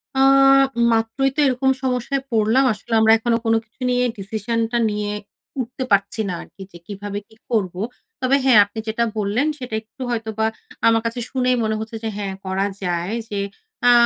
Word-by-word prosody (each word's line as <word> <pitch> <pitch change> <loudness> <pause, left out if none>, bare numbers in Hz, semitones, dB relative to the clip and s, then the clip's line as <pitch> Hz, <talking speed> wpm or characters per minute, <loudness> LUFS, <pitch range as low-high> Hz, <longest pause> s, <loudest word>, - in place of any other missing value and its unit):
অ্যা 270 0 +5 0.7
মাত্রই 225 +4 +1
তো - - -3
এরকম 265 +1 +1
সমস্যায় 260 +1 0
পড়লাম 225 +4 +3
আসলে 215 +3 -8
আমরা 220 0 +6
এখনো 230 +1 +1
কোন 225 - +3
কিছু 230 +4 -39
নিয়ে 250 0 +2
ডিসিশন 215 +3 -3
টা 240 - +1
নিয়ে 210 0 -2 0.5
উঠতে 255 +2 -5
পারছি 200 +2 +2
না - - -2
আর - - -11
কি 195 - -13
যে, 170 - -11
কিভাবে 205 0 -5
কি 220 - -21
করব। 210 -7 0 0.5
তবে 260 +1 +3
হ্যাঁ, 250 -5 +7
আপনি 205 +2 -8
যেটা 225 +2 0
বললেন 215 +7 +1
সেটা 250 -5 -5
একটু 220 +4 -17
হয়তো 225 -2 -2
বা 220 - +3 0.4
আমার 225 0 +4
কাছে 230 +1 -2
শুনেই 255 -1 +2
মনে 220 0 0
হচ্ছে 220 +1 -6
যে 225 - -1
হ্যাঁ 200 -2 -3
করা 190 +1 0 0.2
যায় 175 +2 -1 0.2
যে, 205 - -2 0.4
অ্যা 245 - +7
225 Hz, 190 wpm, -21 LUFS, 205-250 Hz, 0.7 s, হ্যাঁ